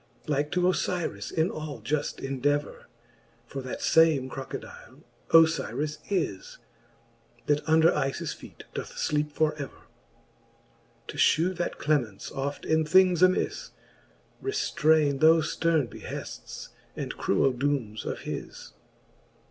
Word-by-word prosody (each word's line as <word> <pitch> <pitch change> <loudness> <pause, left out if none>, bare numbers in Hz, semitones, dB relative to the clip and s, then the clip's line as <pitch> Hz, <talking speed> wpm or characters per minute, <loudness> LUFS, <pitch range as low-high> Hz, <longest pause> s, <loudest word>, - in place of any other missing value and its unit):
Like 150 0 -1
to 180 0 +2
Ofyris 175 - -1
in 160 +2 0
all 155 -2 -6
juft 145 -2 -2
endever. 145 +2 -1 0.6
For 135 +3 -6
that 130 -1 -6
fame 160 -5 +4
Crocodile 135 -1 -8 0.3
Ofyris 160 -2 +3
is> 165 - -2 0.9
That 150 0 +2
under 160 +1 +6
JJis 135 0 -2
feete - - -13
doth - - -5
fleepe 150 0 -1
for 155 +1 +1
ever: 140 - -9 1.3
To - - -6
fhew, 175 +5 +3
that 175 0 -3
clemence 125 -10 -1
oft 140 +1 -4
in 160 0 +2
things 180 +2 +4
amis 185 0 +2 0.7
Reftraines 155 - +2
thofe 160 0 +4
fterne 160 -5 +2
behefts, - - -8 0.3
and - - -4
cruell 130 +7 +2
doomes 125 -5 -1
of - - -4
his. - - -7
150 Hz, 115 wpm, -27 LUFS, 135-165 Hz, 1.3 s, under